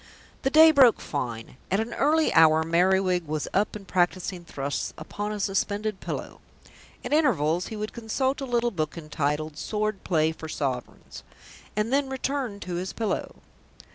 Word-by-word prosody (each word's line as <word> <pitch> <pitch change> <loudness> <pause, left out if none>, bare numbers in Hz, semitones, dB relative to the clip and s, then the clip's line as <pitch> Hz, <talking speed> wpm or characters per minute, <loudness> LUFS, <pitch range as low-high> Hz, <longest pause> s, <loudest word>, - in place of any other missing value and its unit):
The 270 - +1
day 315 +2 +8
broke 265 -6 +6
fine. 115 0 -5
At 195 - +1
an 225 +2 -3
early 310 +3 +2
hour 160 0 +6
Merriwig 180 +1 +2
was 155 0 -2
up 205 +2 +1
and 200 -2 -9
practising 180 0 0
thrusts 140 -3 -4
upon 205 +1 -5
a 210 - -4
suspended 205 +1 -1
pillow. - - -6 0.6
At - - -2
intervals 180 - +2
he 220 - -6
would 215 0 -5
consult 260 +4 -1
a - - -2
little 240 -1 +1
book 155 -4 -3
entitled 150 -1 -2
Sword 215 +2 -2
Play 160 -3 +2
for 160 0 -8
Sovereigns, 130 -5 -4 0.5
and 215 +4 0
then 280 -1 +2
return 265 -5 -3
to 175 -1 -4
his 185 +2 -4
pillow. 220 -4 -2
195 Hz, 160 wpm, -26 LUFS, 160-235 Hz, 0.6 s, day